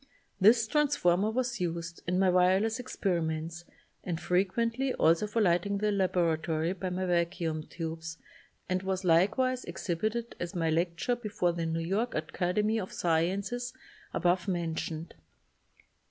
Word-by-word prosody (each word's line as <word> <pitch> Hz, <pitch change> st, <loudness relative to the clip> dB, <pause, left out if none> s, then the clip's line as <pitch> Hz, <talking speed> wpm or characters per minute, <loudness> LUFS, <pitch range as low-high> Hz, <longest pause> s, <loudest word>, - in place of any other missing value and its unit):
This 220 Hz, +3 st, +6 dB
transformer 220 Hz, -, +2 dB
was 240 Hz, -1 st, -1 dB
used 170 Hz, -1 st, -3 dB
in 180 Hz, +1 st, +1 dB
my 190 Hz, 0 st, +4 dB
wireless 185 Hz, +5 st, +3 dB
experiments 170 Hz, -7 st, -2 dB, 0.4 s
and 170 Hz, -3 st, -3 dB
frequently 230 Hz, +9 st, 0 dB
also 165 Hz, +6 st, +3 dB
for 220 Hz, +1 st, +1 dB
lighting 180 Hz, +2 st, +2 dB
the 210 Hz, +1 st, +1 dB
laboratory 170 Hz, -3 st, +1 dB
by 190 Hz, 0 st, -4 dB
my 185 Hz, +1 st, -2 dB
vac 175 Hz, 0 st, 0 dB
uum 155 Hz, -2 st, -3 dB
tubes 160 Hz, -1 st, -5 dB, 0.5 s
and 185 Hz, 0 st, 0 dB
was 190 Hz, 0 st, -2 dB
likewise 220 Hz, +10 st, +3 dB
exhibited 215 Hz, +7 st, -3 dB
at 175 Hz, +2 st, -4 dB
my 165 Hz, -2 st, +1 dB
lecture 170 Hz, +8 st, 0 dB
before 205 Hz, -7 st, -1 dB
the 170 Hz, -1 st, -2 dB
New 165 Hz, 0 st, -1 dB
York 215 Hz, +7 st, -1 dB
Academy 185 Hz, +7 st, 0 dB
of 190 Hz, -, -5 dB
Sciences 195 Hz, +9 st, 0 dB, 0.4 s
above 180 Hz, +1 st, +1 dB
mentioned. 165 Hz, -2 st, -3 dB
180 Hz, 135 wpm, -30 LUFS, 170-210 Hz, 0.5 s, This